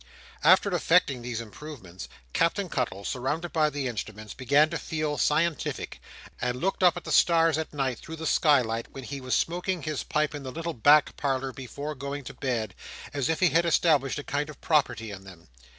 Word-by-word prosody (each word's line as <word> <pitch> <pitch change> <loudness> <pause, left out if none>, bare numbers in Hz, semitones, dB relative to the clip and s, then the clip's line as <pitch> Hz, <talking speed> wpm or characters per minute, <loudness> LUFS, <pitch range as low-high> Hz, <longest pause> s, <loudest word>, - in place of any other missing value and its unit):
After 185 +4 +5
effecting 165 -6 +3
these 120 -1 -4
improvements, 115 - -9 0.2
Captain 180 +3 +1
Cuttle, 115 -8 -2
surrounded 150 +7 -2
by 155 -2 +3
the 145 -2 -3
instruments, 110 -2 -6
began 140 +4 +3
to 165 - -2
feel 155 -2 -2
scientific: 160 +1 0 0.4
and 125 0 -1
looked 195 +4 -1
up 180 -1 +5
at 175 - -6
the - - -6
stars 165 -2 +4
at 160 - -4
night, 135 -4 -2
through 160 - -8
the 160 0 -6
skylight, 120 -9 +2
when 135 - -7
he 140 +2 -6
was 130 -1 0
smoking 175 0 -1
his 155 -3 -2
pipe 155 0 0
in 145 - -5
the 130 -1 -6
little 165 +3 -4
back 145 +5 +5
parlour 135 -1 -1
before 140 +4 -6
going 140 +1 -5
to - - -8
bed, 120 -5 -2 0.4
as 140 +1 -1
if 160 +1 0
he 180 - +6
had 165 +2 +3
established 150 -5 +3
a 145 - -4
kind 145 +2 -2
of 155 - -11
property 130 -8 +1
in 95 -1 -9
them. 90 -6 -14
145 Hz, 195 wpm, -27 LUFS, 125-160 Hz, 0.4 s, he